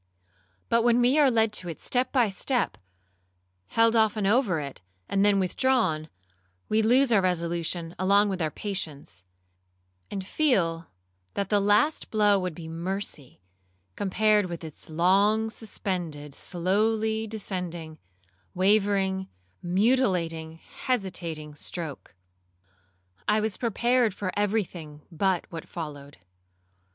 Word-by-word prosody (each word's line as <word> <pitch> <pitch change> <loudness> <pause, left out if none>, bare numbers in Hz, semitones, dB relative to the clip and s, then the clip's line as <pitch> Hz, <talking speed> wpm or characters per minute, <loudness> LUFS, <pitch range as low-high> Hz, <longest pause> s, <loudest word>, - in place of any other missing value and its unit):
But 230 0 +3
when 240 +1 +4
we 250 +5 +4
are 285 -3 +6
led 225 -3 +2
to 180 - 0
it 165 - -7
step 250 +1 0
by 245 -5 +3
step, 240 +6 -1 0.9
held 230 0 +3
often 220 -2 +2
over 205 - +2
it, 140 -7 -7 0.3
and 195 0 +1
then 205 -1 +4
withdrawn, 185 - +1 0.6
we 215 +1 +3
lose 245 +4 +4
our 210 -4 +5
resolution 170 -1 -2
along 200 +2 +4
with 190 -2 -3
our 155 - +1
patience; 155 - -6 0.9
and 195 -1 -5
feel, 180 - +1 0.5
that 200 -1 -2
the 205 - +3
last 205 +10 +2
blow 210 -2 +3
would 180 -3 -3
be 165 -1 -8
mercy, 165 - -5 0.5
compared 210 +1 +2
with 170 -1 -6
its 160 -1 -9
long 200 +7 +3
suspended, 175 -10 -4
slowly 220 +7 0
descending, 180 -7 -5 0.6
wavering, 190 0 +2 0.3
mutilating, 180 -5 +1
hesitating 175 -10 -3
stroke. 150 - -6 1.1
I 210 +1 +3
was 215 -2 -1
prepared 235 -1 +1
for 185 -2 -3
every 205 +1 +1
thing 155 -5 -11
but 180 +1 0
what 165 -2 -8
followed. 145 -4 -7
195 Hz, 120 wpm, -27 LUFS, 170-220 Hz, 1.1 s, are